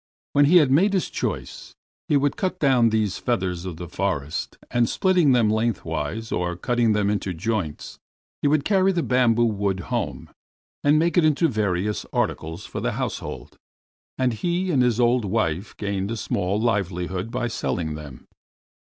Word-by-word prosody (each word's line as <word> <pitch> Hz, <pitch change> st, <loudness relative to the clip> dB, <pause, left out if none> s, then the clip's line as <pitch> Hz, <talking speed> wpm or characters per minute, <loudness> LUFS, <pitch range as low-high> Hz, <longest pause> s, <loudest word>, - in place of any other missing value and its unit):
When 145 Hz, 0 st, +5 dB
he 175 Hz, +5 st, +6 dB
had 145 Hz, -6 st, +4 dB
made 190 Hz, +9 st, +4 dB
his 190 Hz, -, 0 dB
choice, -, -, -4 dB, 0.3 s
he 145 Hz, -, +3 dB
would 140 Hz, 0 st, +1 dB
cut 185 Hz, -1 st, -2 dB
down 130 Hz, -5 st, +4 dB
these 110 Hz, -3 st, 0 dB
feathers 95 Hz, -7 st, -1 dB
of 90 Hz, -4 st, -5 dB
the 90 Hz, +1 st, -7 dB
forest, 70 Hz, -2 st, -3 dB
and 120 Hz, -2 st, +2 dB
splitting 180 Hz, -6 st, +3 dB
them 120 Hz, -3 st, +4 dB
lengthwise, 110 Hz, -3 st, -2 dB
or 90 Hz, 0 st, -1 dB
cutting 115 Hz, +4 st, +1 dB
them 105 Hz, -1 st, +1 dB
into 100 Hz, -3 st, -2 dB
joints, 95 Hz, -4 st, -3 dB, 0.4 s
would 145 Hz, 0 st, +2 dB
carry 195 Hz, -2 st, +3 dB
the 170 Hz, -2 st, 0 dB
bamboo 120 Hz, -2 st, +3 dB
wood 100 Hz, -3 st, 0 dB
home -, -, -3 dB, 0.5 s
and 145 Hz, +1 st, +4 dB
make 170 Hz, +3 st, +3 dB
it -, -, +3 dB
into 155 Hz, +2 st, +3 dB
various 105 Hz, -, -1 dB
articles 80 Hz, +1 st, -2 dB
for -, -, -6 dB
the -, -, -1 dB
household, -, -, -5 dB, 0.6 s
and 130 Hz, -2 st, +1 dB
he 175 Hz, -, -1 dB
and 135 Hz, -5 st, +3 dB
his 125 Hz, -2 st, +2 dB
old 120 Hz, 0 st, +3 dB
wife 95 Hz, -3 st, -1 dB
gained 100 Hz, -1 st, -2 dB
a 115 Hz, -, -3 dB
small 100 Hz, -1 st, -1 dB
livelihood 95 Hz, -3 st, -1 dB
by 125 Hz, 0 st, -2 dB
selling 85 Hz, -8 st, -2 dB
them. 75 Hz, -4 st, -10 dB
115 Hz, 165 wpm, -24 LUFS, 95-140 Hz, 0.6 s, he